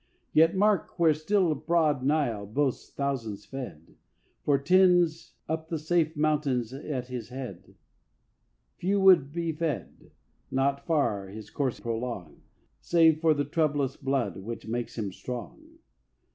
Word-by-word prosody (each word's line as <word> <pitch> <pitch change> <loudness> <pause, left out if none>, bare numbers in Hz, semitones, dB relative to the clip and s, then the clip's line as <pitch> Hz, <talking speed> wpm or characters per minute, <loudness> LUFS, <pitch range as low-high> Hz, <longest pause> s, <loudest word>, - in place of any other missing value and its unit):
Yet 165 +3 +5
mark 205 -2 +2
where 165 -3 +5
still 170 +2 +1
broad 155 -2 +1
Nile 130 -8 0
boasts 135 +4 -1
thousands 115 -8 -3
fed, 120 - -9 0.5
For 145 -1 +3
tens 175 +1 +3
up 160 0 -3
the 165 - -1
safe 160 0 0
mountains 145 -6 0
at 135 -2 -5
his 125 -2 -6
head. 130 0 -8 1.0
Few 195 +3 +1
would 185 -8 +6
be 170 +1 -2
fed, 155 - -4 0.4
not 140 +1 0
far 125 - +1
his 105 +1 -10
course 135 -4 -1
prolong, 115 -8 -5 0.4
Save 160 -2 +4
for 160 -2 +4
the 145 0 0
troublous 145 -3 0
blood 130 -9 -1
which 110 +4 -7
makes 120 +1 -4
him 105 -4 -2
strong. 310 - -8
145 Hz, 130 wpm, -28 LUFS, 125-165 Hz, 1.0 s, would